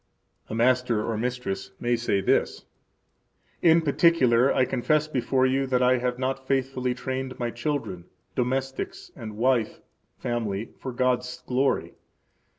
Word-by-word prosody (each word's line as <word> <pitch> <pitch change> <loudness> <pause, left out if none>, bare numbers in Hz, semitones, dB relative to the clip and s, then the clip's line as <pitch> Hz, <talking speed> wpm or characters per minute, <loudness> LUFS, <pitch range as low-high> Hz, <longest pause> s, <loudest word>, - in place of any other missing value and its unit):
A - - -4
master 120 -2 +2
or 115 - -2
mistress 110 -4 -3
may 120 0 +1
say 115 -4 0
thus: - - +1 1.0
In 165 -1 +5
particular 140 -5 +4
I 130 - +3
confess 150 +5 +1
before 130 -2 +1
you 135 +1 +1
that 125 -1 +2
I 125 0 +4
have 125 0 -1
not 130 +1 -3
faithfully 130 -2 0
trained 130 +1 -4
my 120 -1 -2
children, 120 - -3 0.3
domestics, 135 - -2
and 110 -1 -8
wife 120 -2 +1 0.4
[family] 115 -3 -3
for 130 - -5
God's 125 0 -1
glory. 130 +2 0
125 Hz, 135 wpm, -26 LUFS, 120-135 Hz, 1.0 s, In